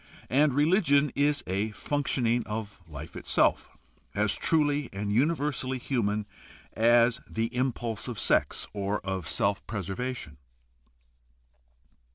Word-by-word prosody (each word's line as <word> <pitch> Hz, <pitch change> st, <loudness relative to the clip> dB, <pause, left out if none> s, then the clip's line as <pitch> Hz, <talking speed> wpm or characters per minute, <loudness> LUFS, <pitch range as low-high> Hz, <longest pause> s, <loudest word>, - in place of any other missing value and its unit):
And 140 Hz, +1 st, +3 dB
religion 150 Hz, -2 st, +3 dB
is 145 Hz, 0 st, +1 dB
a 100 Hz, +4 st, -1 dB
functioning 125 Hz, -2 st, 0 dB
of 105 Hz, -2 st, -5 dB
life 75 Hz, 0 st, -9 dB
itself -, -, +1 dB, 0.5 s
as -, -, +2 dB
truh" 145 Hz, -3 st, +1 dB
and 100 Hz, +1 st, -3 dB
uni\ 145 Hz, +9 st, +3 dB
ersally 130 Hz, -3 st, -2 dB
human 105 Hz, -5 st, -1 dB, 0.5 s
as 120 Hz, +1 st, +4 dB
the 115 Hz, +2 st, -2 dB
impulse 120 Hz, -3 st, -2 dB
of 120 Hz, -3 st, -5 dB
sex -, -, +1 dB
or 100 Hz, 0 st, -1 dB
of 95 Hz, -4 st, -4 dB
self 100 Hz, +5 st, 0 dB
preservation. 100 Hz, -, -4 dB
120 Hz, 115 wpm, -28 LUFS, 105-140 Hz, 0.5 s, as